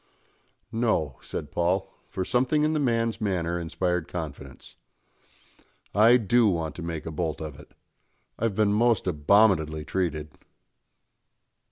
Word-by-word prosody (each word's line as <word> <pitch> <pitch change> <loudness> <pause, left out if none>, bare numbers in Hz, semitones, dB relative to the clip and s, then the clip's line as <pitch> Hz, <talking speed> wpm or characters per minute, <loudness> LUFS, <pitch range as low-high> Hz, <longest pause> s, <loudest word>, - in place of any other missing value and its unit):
"No," 110 - 0
said 75 - -6
Paul; 90 +3 0 0.2
for 95 - -3
something 130 +7 +1
in 155 +1 +2
the 155 - 0
man's 115 -5 0
manner 85 -4 -1
inspired 90 +1 -2
confidence. 70 -6 -8 1.2
"I 115 +5 +6
do 120 +1 +3
want 80 -6 -1
to - - -6
make 85 -2 -5
a 80 - -4
bolt 80 0 -3
of 75 -4 -7
it. - - -16 0.6
I've 115 -3 0
been 105 -1 +2
most 115 0 +2
abominably 80 -2 +3
treated." 80 -4 -2
90 Hz, 130 wpm, -26 LUFS, 80-110 Hz, 1.2 s, I